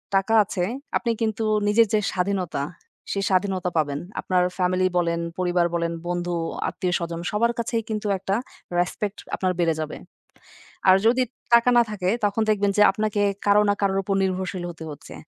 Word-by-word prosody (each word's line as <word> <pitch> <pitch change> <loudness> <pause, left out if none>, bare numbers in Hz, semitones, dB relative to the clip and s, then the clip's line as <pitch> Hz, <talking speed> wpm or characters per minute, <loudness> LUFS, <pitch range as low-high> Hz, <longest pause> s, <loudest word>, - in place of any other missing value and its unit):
টাকা 195 +4 +2
আছে, 185 -2 -3 0.3
আপনি 235 - -1
কিন্তু 220 0 0 0.2
নিজের 220 +2 +5
যে 215 - +4
স্বাধীনতা, 180 -5 -1 0.5
সেই 200 0 -1
স্বাধীনতা 185 -1 +1
পাবেন। 145 -2 0 0.2
আপনার 180 -1 +2
ফ্যামিলি 185 0 +2
বলেন, 170 -1 +1 0.2
পরিবার 175 -1 +2
বলেন, 170 0 0 0.2
বন্ধু, 175 0 -2 0.3
আত্মীয়-স্বজন 170 -2 -2
সবার 235 +3 +2
কাছেই 230 0 -1
কিন্তু 215 -1 -2
একটা 195 +1 -1 0.4
রেসপেক্ট 200 +3 -2 0.2
আপনার 185 -1 0
বেড়ে 165 -2 +3
যাবে। 155 -1 -4 0.9
আর 185 - +8
যদি 250 +3 +4 0.3
টাকা 235 +1 +6
না - - +8
থাকে, 190 -3 -2 0.2
তখন 205 +2 0
দেখবেন 205 -1 +2
যে - - +5
আপনাকে 210 0 -1 0.2
কারো 205 +1 +5
না - - +4
কারোর 195 -1 +2
উপর 195 0 -1
নির্ভরশীল 185 -1 -2
হতে 160 -1 -10
হচ্ছে। 145 - -11
190 Hz, 160 wpm, -24 LUFS, 175-210 Hz, 0.9 s, আর